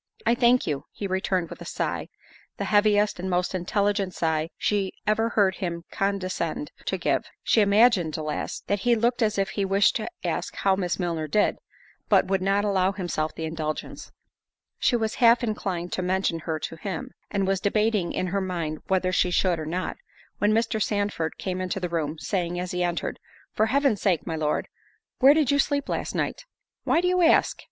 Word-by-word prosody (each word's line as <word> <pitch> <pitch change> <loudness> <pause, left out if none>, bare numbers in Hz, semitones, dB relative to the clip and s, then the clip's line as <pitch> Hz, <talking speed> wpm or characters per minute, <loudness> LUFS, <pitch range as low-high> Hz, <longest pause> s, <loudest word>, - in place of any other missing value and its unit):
"I - - +4
thank 245 0 +4
you," 145 -3 -3
he 205 - -6
returned 190 -2 -1
with - - -9
a - - -7
sigh—the - - -6
heaviest 205 -1 +3
and 190 +1 -3
most 180 +1 0
intelligent 195 +1 0
sigh 160 -1 0
she 200 -2 0
ever 220 +2 +2
heard 195 -4 +2
him 170 -3 -4
condescend 195 - -2
to - - -1
give. - - 0 0.2
She 225 - +4
imagined, 200 -5 +4
alas, 155 -1 -3
that 205 - 0
he 240 +3 +3
looked 240 +2 +1
as 215 -2 +1
if 195 -1 +1
he 200 - -2
wished 195 +1 +3
to 220 - -4
ask - - -2
how 195 -1 +2
Miss 180 -2 -1
Milner 170 -4 -2
did, 205 +8 +1 0.5
but - - +5
would 190 0 0
not 200 +2 +2
allow 195 -1 +2
himself 175 -5 -3
the 160 - -4
indulgence. 155 -1 -5 0.7
She 245 - +3
was 220 -2 0
half 235 +1 +6
inclined 190 -6 -3
to - - -1
mention 185 -2 0
her 160 0 -3
to 165 +1 -6
him, 185 +1 -5 0.2
and 195 -1 0
was 195 0 +1
debating 210 -3 +1
in - - -1
her 200 - +1
mind 170 -5 -3
whether 185 -1 +1
she 185 0 +2
should 175 -1 +2
or 155 - -5
not, 180 +3 -3 0.4
when 205 +1 +3
Mr. 225 0 +1
Sandford 205 -6 -1
came 185 -1 -3
into 185 +1 -2
the 180 -1 -3
room, 160 -2 -2
saying, 175 0 -2
as 180 0 -4
he 180 - -2
entered, 175 -1 -2 0.3
"For 220 - +2
Heaven's 275 -4 +2
sake, 185 -6 +1
my 165 - -3
Lord, 150 -1 -1 0.5
where 275 +3 +7
did 300 -4 +3
you 285 - +2
sleep 285 0 +1
last - - -3
night?" - - -2 0.4
"Why 330 - +3
do 360 - +1
you 365 0 +2
ask!" 335 - +4
190 Hz, 195 wpm, -25 LUFS, 175-215 Hz, 0.7 s, where